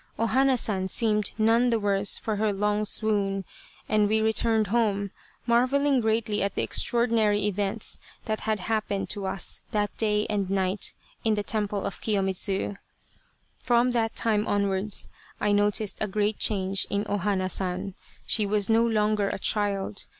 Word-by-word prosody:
O 230 - +1
Hana 265 +2 +3
San 190 -5 -1
seemed 210 0 +1
none 230 +3 +3
the 230 -1 +1
worse 200 -1 +2
for 215 -2 -3
her 215 0 +1
long 210 +1 0
swoon, 200 -3 -1 0.4
and 210 -1 +2
we 220 +1 +2
returned 220 0 +2
home, 205 -4 +1 0.3
marvelling 260 +4 +3
greatly 220 -1 0
at 200 0 -1
the - - 0
extraordinary 225 -4 +1
events 205 +1 -1 0.3
that 215 -1 -2
had 215 -1 -2
happened 215 -3 -2
to 200 -2 -3
us 190 -1 -3
that 205 -1 -1
day 210 -1 +1
and 205 -3 -1
night 190 0 0 0.3
in 220 -1 +2
the 205 - -2
temple 205 -1 -2
of 200 - -5
Kiyomidzu. 195 -1 0 0.4
'' - - -41
From 240 +1 +4
that 225 -2 0
time 215 -1 0
onwards 200 0 0 0.3
I 210 - +1
noticed 205 0 +1
a 215 - +1
great 210 +1 -1
change 195 -2 +1
in 200 +1 -1
O 205 - 0
Hana 190 -1 0
San. 185 +1 -2 0.3
She 215 -2 +1
was 205 +1 +1
no 225 +1 +4
longer 210 -3 +1
a - - -3
child. 200 0 -2
210 Hz, 165 wpm, -26 LUFS, 200-220 Hz, 0.4 s, From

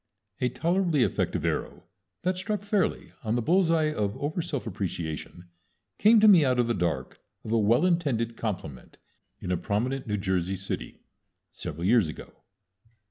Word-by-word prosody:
"] 100 -1 -37
A 125 - +2
tolerably 170 0 +1
effective - - -1
arrow - - -2 0.4
that 185 0 +1
struck 205 +2 -3
fairly 205 -3 0
on 110 0 0
the 120 - +1
bullseye 165 -1 +3
of 105 -7 -2
over 155 +4 -2
self 145 -5 -4
appreciation 90 -4 -5 0.5
came 220 +2 +6
to 215 - +6
me 185 -7 +8
out 130 -2 +2
of 120 -1 +2
the 120 - +1
dark, 80 - -2 0.2
of 110 - -6
a 115 - +3
well 115 - +3
intended 135 -10 0
compliment 85 - -5 0.4
in 90 - -4
a 90 - +1
prominent 125 +8 -2
New 105 -1 -1
Jersey 95 -1 -1
city 95 +1 -6 0.5
several 85 +4 -6
years 110 -3 +4
ago. 75 - -9
120 Hz, 165 wpm, -27 LUFS, -, 0.5 s, me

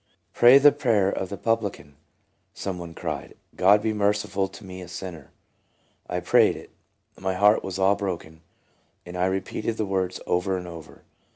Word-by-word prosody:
" - - -47
Pray 120 +3 +8
the 145 +1 +7
prayer 115 -10 +1
of 95 - -4
the 100 - -5
publican," 100 -10 -2 0.6
some 95 -2 -4
one 85 -1 -9
cried; - - -5
' - - -31
God 105 +2 +6
be 110 -1 0
merciful 100 -1 0
to 105 - -13
me 95 0 -8
a 90 - -9
sinner.' 90 -2 -8 0.5
' - - -42 0.3
I 90 - -1
prayed 90 - +4
it. - - -12 0.5
My 95 0 -2
heart 105 +3 +4
was 95 -1 -5
all 95 +1 +3
broken, 85 -5 -5 0.6
and 90 0 -9
I 90 0 +1
repeated 95 +4 -3
the 110 - -1
words 95 -2 -2
over 95 +2 0
and 90 -1 -7
over. 85 -3 -11
95 Hz, 185 wpm, -25 LUFS, 90-105 Hz, 0.6 s, Pray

